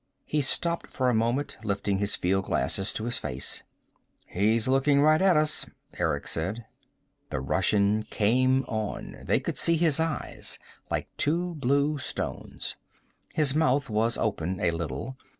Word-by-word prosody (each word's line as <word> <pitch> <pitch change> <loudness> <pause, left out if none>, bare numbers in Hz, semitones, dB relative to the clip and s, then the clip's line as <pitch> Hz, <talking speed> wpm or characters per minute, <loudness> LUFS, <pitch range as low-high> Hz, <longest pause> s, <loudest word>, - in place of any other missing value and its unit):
He 150 - 0
stopped 170 +5 0
for 130 -1 0
a - - +2
moment, 120 +6 0
lifting 100 -1 -1
his 100 0 0
fieldglasses 95 0 +1
to 110 - -2
his 120 0 0
face. 65 -3 -4 0.6
"He's 110 +5 +1
looking 135 +2 +3
right 155 +3 +5
at 190 -4 +5
us," 155 0 +2 0.3
Eric 80 -5 -1
said. 100 +8 -3 0.6
The - - -2
Russian 100 +10 +2
came 130 +5 +3
on. 110 -2 -4
They - - +1
could - - -3
see 170 0 +3
his 160 -3 +3
eyes, 160 -1 -2 0.3
like - - -2
two 175 +4 0
blue 145 +1 +1
stones. - - -4 0.6
His 150 -4 +4
mouth 140 -4 +2
was 115 +2 +2
open 95 -4 -1
a 85 - +2
little. 85 - -4
120 Hz, 145 wpm, -27 LUFS, 100-145 Hz, 0.6 s, right